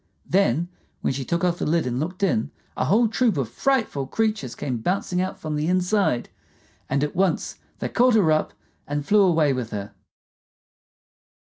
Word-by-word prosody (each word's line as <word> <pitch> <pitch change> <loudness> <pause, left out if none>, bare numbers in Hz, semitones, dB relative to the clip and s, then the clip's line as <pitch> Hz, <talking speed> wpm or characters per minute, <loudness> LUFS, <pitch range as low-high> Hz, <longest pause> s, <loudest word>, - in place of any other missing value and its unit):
Then, 175 -4 +2 0.3
when - - 0
she 135 +1 -3
took 170 +6 -1
off 175 -1 +1
the - - -1
lid 165 0 +1
and 125 0 -2
looked 180 +6 -4
in, 115 - +1 0.3
a - - 0
whole 225 +4 +4
troop 225 -4 +1
of 135 -4 0
frightful 220 - 0
creatures 215 - -1
came 125 -3 -3
bouncing 180 - -1
out 185 +1 -3
from 155 -1 -4
the 150 +1 -1
inside, 185 - +1 0.6
and 140 +2 +1
at 150 - -2
once 185 -1 0 0.2
they - - -3
caught 245 0 +4
her 185 -8 +4
up 155 - +1 0.4
and 145 0 -2
flew 210 +4 +4
away 165 -7 +3
with 125 -3 -3
her. 105 -2 -6
170 Hz, 175 wpm, -24 LUFS, 140-195 Hz, 0.6 s, whole